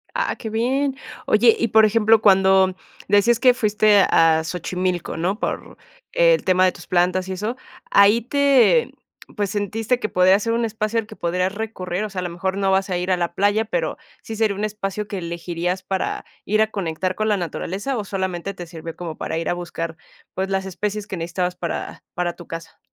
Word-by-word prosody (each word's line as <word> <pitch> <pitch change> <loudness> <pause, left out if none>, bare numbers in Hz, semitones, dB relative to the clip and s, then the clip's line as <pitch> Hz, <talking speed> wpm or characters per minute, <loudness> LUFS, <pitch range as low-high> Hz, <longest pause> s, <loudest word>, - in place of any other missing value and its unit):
Ah, - - 0
qué 225 - -6
bien. 260 +5 0 0.3
Oye, 225 +2 +5
y 235 - +2
por 220 +1 +6
ejemplo, 220 0 +4
cuando 190 -2 +4 0.3
decías 215 +3 +4
que 255 -1 +6
fuiste 210 -2 +3
a 160 -1 +4
Xochimilco, 180 0 -3
¿no?, 185 +6 -1
por - - -4 0.4
el - - +4
tema 185 0 +3
de 185 - +3
tus 175 - -13
plantas 180 +1 +1
y - - -2
eso, 210 +6 -3 0.4
ahí 205 +3 +6
te 280 - +3 0.4
pues, 205 -1 -1
¿sentiste 215 +4 -1
que 215 - -2
podría 185 0 +4
ser 230 +2 -1
un 235 +1 0
espacio 220 0 -1
al 225 - -3
que 215 0 -13
podrías 180 +2 -1
recurrir, 205 -3 -4
o - - -5
sea, 190 -2 -5
a - - -1
lo 175 - -3
mejor 190 +3 -3
no 195 -1 +1
vas 190 +1 +1
a 180 - 0
ir 180 +1 -2
a 180 - +3
la 170 -1 -2
playa, 205 +3 +2
pero, - - -2 0.3
sí 220 -1 -6
sería 215 -3 +1
un 205 - -4
espacio 210 -1 -3
que 200 - -4
elegirías 175 +1 -3
para 190 0 -2 0.2
ir 215 +2 +2
a 220 0 +1
conectar 185 -2 -2
con 215 +3 -2
la 210 - +3
naturaleza, 195 - -3
¿o 210 - -3
solamente 190 -1 -3
te 180 -2 -8
sirvió 165 -1 -8
como 165 -3 -6
para 160 - -3
ir 165 - -2
a - - +2
buscar, 165 -2 -5 0.4
pues, 190 +1 -2
las 195 0 -1
especies 205 +2 -4
que 190 - -5
necesitabas 180 +2 -2
para 170 -2 -5
para 175 -1 -2
tu 175 - -12
casa? 165 0 -8
195 Hz, 205 wpm, -22 LUFS, 180-215 Hz, 0.4 s, por